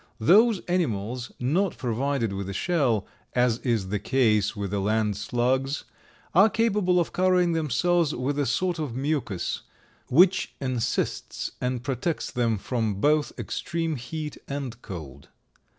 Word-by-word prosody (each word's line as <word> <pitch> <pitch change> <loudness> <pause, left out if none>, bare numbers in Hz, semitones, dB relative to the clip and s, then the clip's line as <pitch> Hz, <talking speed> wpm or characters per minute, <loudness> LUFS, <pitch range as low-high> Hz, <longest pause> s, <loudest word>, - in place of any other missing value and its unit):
Those 210 - +5
animals 125 - -2
not 170 +10 +1
provided 125 -2 -1
with 100 0 -4
a 100 - -5
shell, 130 - +1 0.3
as 125 -2 +2
is 115 -7 -1
the 105 +1 -1
case 110 -2 +2
with 100 -2 -4
the 100 - 0
land 105 +1 +1
slugs, 125 +6 0 0.5
are 195 +6 +7
capable 210 -5 +2
of 170 - -1
covering 180 -1 +3
themselves 165 +1 +1
with 140 +3 -1
a 145 - +1
sort 175 +7 0
of 145 -7 -3
mucus 135 - -2 0.5
which 185 +7 +4
encysts 125 -3 -2
and 125 -1 -1
protects 135 +5 -2
them 115 -3 +1
from 110 0 -1
both 150 +8 +2
extreme 165 -2 -2
heat 150 +4 -5
and 135 -4 -5
cold. 80 -9 -9
130 Hz, 135 wpm, -26 LUFS, 110-165 Hz, 0.5 s, are